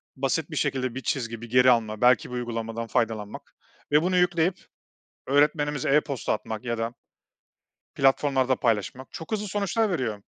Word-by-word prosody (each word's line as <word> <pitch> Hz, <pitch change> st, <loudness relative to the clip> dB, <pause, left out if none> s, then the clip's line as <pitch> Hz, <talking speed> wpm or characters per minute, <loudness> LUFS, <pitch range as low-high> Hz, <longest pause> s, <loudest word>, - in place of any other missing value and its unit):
Basit 135 Hz, +5 st, -1 dB
bir -, -, -5 dB
şekilde 130 Hz, -4 st, -1 dB
bir 130 Hz, -, -4 dB
çizgi, 115 Hz, -3 st, -3 dB
bir 120 Hz, -, -9 dB
geri 125 Hz, +1 st, +6 dB
alma, 110 Hz, -3 st, 0 dB
belki 125 Hz, -1 st, +4 dB
bir 125 Hz, -, -6 dB
uygulamadan 115 Hz, -1 st, -4 dB
faydalanmak 110 Hz, -2 st, -2 dB, 0.4 s
ve 150 Hz, +1 st, +5 dB
bunu 180 Hz, +2 st, +1 dB
yükleyip 180 Hz, 0 st, +1 dB, 0.6 s
öğretmenimize 145 Hz, 0 st, +2 dB
e-posta 140 Hz, -4 st, 0 dB
atmak 110 Hz, +2 st, -5 dB
ya 120 Hz, -1 st, -2 dB
da 115 Hz, +1 st, -3 dB, 1.0 s
platformlarda 135 Hz, -1 st, +2 dB
paylaşmak 120 Hz, +2 st, -1 dB
çok 160 Hz, -, -9 dB
hızlı 210 Hz, -1 st, -2 dB
sonuçlar 205 Hz, +3 st, 0 dB
veriyor. 115 Hz, -, -2 dB
130 Hz, 150 wpm, -26 LUFS, 115-150 Hz, 1.0 s, geri